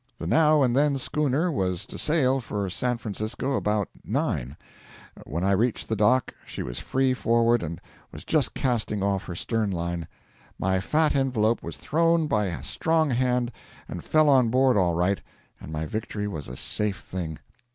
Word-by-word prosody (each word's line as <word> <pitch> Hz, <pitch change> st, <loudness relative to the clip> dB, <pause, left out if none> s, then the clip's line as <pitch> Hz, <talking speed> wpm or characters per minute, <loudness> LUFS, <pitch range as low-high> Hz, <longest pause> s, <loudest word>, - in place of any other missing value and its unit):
The -, -, -6 dB
now 155 Hz, -2 st, +4 dB
and 125 Hz, -2 st, +2 dB
then 140 Hz, 0 st, +3 dB
schooner 150 Hz, +5 st, 0 dB
was 90 Hz, -, -1 dB
to -, -, -9 dB
sail 135 Hz, -4 st, +2 dB
for 105 Hz, -5 st, -3 dB
San 125 Hz, +4 st, 0 dB
Francisco 115 Hz, +4 st, -3 dB
about 105 Hz, -5 st, 0 dB, 0.2 s
nine; 65 Hz, +5 st, -2 dB, 0.7 s
when 85 Hz, +5 st, -3 dB
I 100 Hz, -, +2 dB
reached 110 Hz, +4 st, +1 dB
the 110 Hz, -, +1 dB
dock 115 Hz, +4 st, +2 dB
she -, -, -6 dB
was -, -, -5 dB
free 130 Hz, 0 st, +1 dB
forward 115 Hz, -1 st, +2 dB
and 85 Hz, +1 st, -5 dB, 0.3 s
was -, -, -9 dB
just -, -, +1 dB
casting 110 Hz, -5 st, 0 dB
off 100 Hz, -1 st, 0 dB
her 90 Hz, -, -6 dB
stern 110 Hz, +3 st, -1 dB
line. 85 Hz, -2 st, -3 dB, 0.5 s
My 95 Hz, 0 st, +1 dB
fat 155 Hz, +11 st, +1 dB
envelope 120 Hz, -5 st, +1 dB
was -, -, -7 dB
thrown 165 Hz, +1 st, +2 dB
by 105 Hz, -8 st, +1 dB
a 85 Hz, -, -5 dB
strong 160 Hz, -2 st, +1 dB
hand, 125 Hz, 0 st, +1 dB, 0.4 s
and 85 Hz, -, -7 dB
fell 155 Hz, -1 st, +3 dB
on 130 Hz, -5 st, +5 dB
board 130 Hz, +2 st, +3 dB
all 90 Hz, -4 st, +2 dB
right, 90 Hz, +3 st, +1 dB, 0.4 s
and -, -, -9 dB
my 80 Hz, 0 st, -3 dB
victory 105 Hz, +3 st, -4 dB
was 80 Hz, -8 st, -5 dB
a 60 Hz, -, -7 dB
safe 105 Hz, +7 st, 0 dB
thing. 85 Hz, -4 st, -5 dB
115 Hz, 175 wpm, -26 LUFS, 95-135 Hz, 0.7 s, on